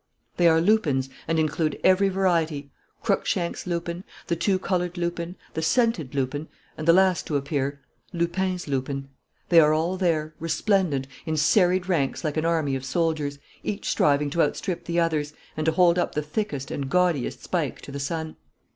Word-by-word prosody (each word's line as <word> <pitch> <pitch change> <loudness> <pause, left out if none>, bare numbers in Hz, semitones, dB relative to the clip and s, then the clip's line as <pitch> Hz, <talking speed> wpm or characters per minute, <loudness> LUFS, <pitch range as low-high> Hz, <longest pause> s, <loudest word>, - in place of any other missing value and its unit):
They 175 - +5
are 160 -1 +5
lupins 155 -9 +2 0.2
and 165 0 +1
include 155 0 0
every 190 +1 +5
variety: 165 -7 0 0.3
Cruikshank's 190 -5 -1
lupin, 170 0 -3 0.2
the 170 - 0
two 190 +3 +1
coloured 180 -1 -1
lupin, 170 0 -3 0.2
the 160 - -2
scented 160 - +1
lupin, 140 +3 -2 0.3
and 155 - -6
the - - +9
last 185 0 +3
to 150 - +1
appear, 140 0 -2 0.3
Lupin's 180 +1 -1
lupin. 135 0 -2 0.4
They 170 - +7
are 155 -1 +5
all 170 +4 0
there, 160 -4 0
resplendent, 165 -4 +1 0.2
in 155 0 0
serried 180 +3 +3
ranks 160 -7 0
like 155 -2 -1
an 155 0 0
army 160 -5 +1
of 130 - -4
soldiers, 150 0 -1 0.2
each 205 - -4
striving 145 0 +2
to 170 - +2
outstrip 170 +4 -1
the 170 0 0
others 150 -3 0 0.2
and 155 0 -2
to - - +5
hold 175 0 +4
up - - -1
the 150 - 0
thickest 150 -4 -3
and 140 -2 -3
gaudiest 175 -6 +1
spike - - -2
to - - -9
the 140 - -5
sun. 160 +2 -4
165 Hz, 175 wpm, -25 LUFS, 145-180 Hz, 0.4 s, the